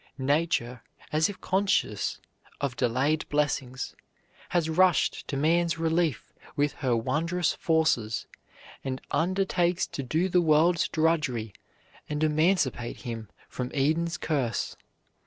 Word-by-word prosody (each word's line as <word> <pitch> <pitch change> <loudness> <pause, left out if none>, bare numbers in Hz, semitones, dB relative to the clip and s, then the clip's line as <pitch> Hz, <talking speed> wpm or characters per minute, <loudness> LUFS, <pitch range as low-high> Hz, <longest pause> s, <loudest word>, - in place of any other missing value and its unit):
Nature, 135 -4 0 0.3
as 155 +3 +2
if 200 - -8
conscious 190 - 0 0.4
of 140 -3 -2
delayed 130 +5 +1
blessings, 135 -3 -1 0.5
has 170 -3 +1
rushed 175 +1 +2
to 140 - -3
man's 165 +2 +2
relief 165 -3 0 0.2
with 145 0 +1
her 130 -4 0
wondrous 170 +9 0
forces, 155 -10 +1 0.6
and 130 -1 -3
undertakes 180 0 +1
to - - -5
do 160 +8 0
the 180 -1 +3
world's 165 +1 +4
drudgery 150 -10 0 0.6
and 150 +1 -1
emancipate 155 -6 +1
him 115 -4 -6 0.2
from 125 -1 -4
Eden's 160 +4 +1
curse. 135 -8 -1
155 Hz, 115 wpm, -27 LUFS, 130-170 Hz, 0.6 s, world's